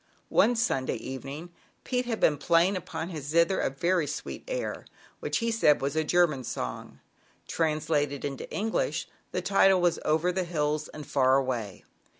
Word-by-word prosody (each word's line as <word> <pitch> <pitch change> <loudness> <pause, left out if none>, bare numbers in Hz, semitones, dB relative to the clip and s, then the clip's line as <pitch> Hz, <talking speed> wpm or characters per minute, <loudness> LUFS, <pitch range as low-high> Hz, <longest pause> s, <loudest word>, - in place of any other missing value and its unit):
One 245 - +4
Sunday 180 - 0
evening 135 +6 -7 0.3
Pete 250 -1 -1
had 225 -2 -2
been 150 -2 +3
playing 170 +5 +3
upon 165 -1 -5
his 155 -6 -6
zither 170 +4 +3
a - - +1
very 170 +4 0
sweet 145 - -5
air, - - -3 0.3
which - - -1
he 230 -1 0
said 185 -10 +4
was 140 +2 -2
a 160 - +2
German 155 -4 +2
song. 60 - -5 0.5
Translated 150 -3 0
into 135 -2 -5
English, 225 - -1 0.2
the - - -2
title 195 -1 +4
was 175 -1 +2
Over 160 +4 +2
the 185 +1 -1
Hills 155 -3 -1
and 150 -1 -9
Far 135 -2 +3
Away." 120 -7 -3
160 Hz, 160 wpm, -28 LUFS, 140-185 Hz, 0.5 s, One